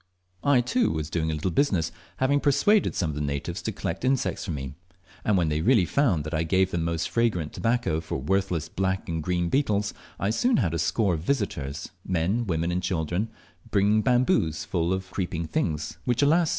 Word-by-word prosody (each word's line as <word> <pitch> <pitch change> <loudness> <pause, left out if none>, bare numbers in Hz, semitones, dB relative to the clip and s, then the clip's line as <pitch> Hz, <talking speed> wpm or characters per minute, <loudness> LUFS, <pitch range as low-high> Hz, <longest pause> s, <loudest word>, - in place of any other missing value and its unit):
I, 140 -3 +4
too, 235 - +1
was 75 0 -3
doing 80 -1 0
a 80 - -1
little 85 +5 -1
business, 90 - +1 0.3
having 140 +2 +2
persuaded 200 +9 +3
some 80 -4 0
of - - -7
the 75 - -3
natives 70 -1 -3
to - - -2
collect 85 +7 -4
insects 130 0 0
for - - -7
me; 65 -4 -4 0.5
and 105 -3 +2
when 85 -3 +2
they 75 +1 0
really 110 0 +4
found 100 - +2
that 75 +2 -6
I 80 - +1
gave 95 +3 +2
them 85 -2 -1
most 85 0 -1
fragrant 105 -10 0
tobacco 115 -9 0
for 80 - -4
worthless 90 +2 0
black 95 0 -1
and 80 -2 -2
green 90 +1 0
beetles, 105 -6 +1 0.3
I 100 - +1
soon 240 - +2
had 85 -3 +1
scores 90 0 +1
of 80 - -10
visitors, 85 - -2
men, 95 +7 0
women, 85 -1 0
and 90 +1 0
children, 90 +4 -1 0.4
bringing 105 0 +3
bamboos 120 -10 +2
full 85 -1 0
of 95 0 -3
creeping 85 -3 -2
things, 80 -1 -2
which, 120 +2 +2
alas! 160 +3 +4
90 Hz, 195 wpm, -26 LUFS, 80-115 Hz, 0.5 s, I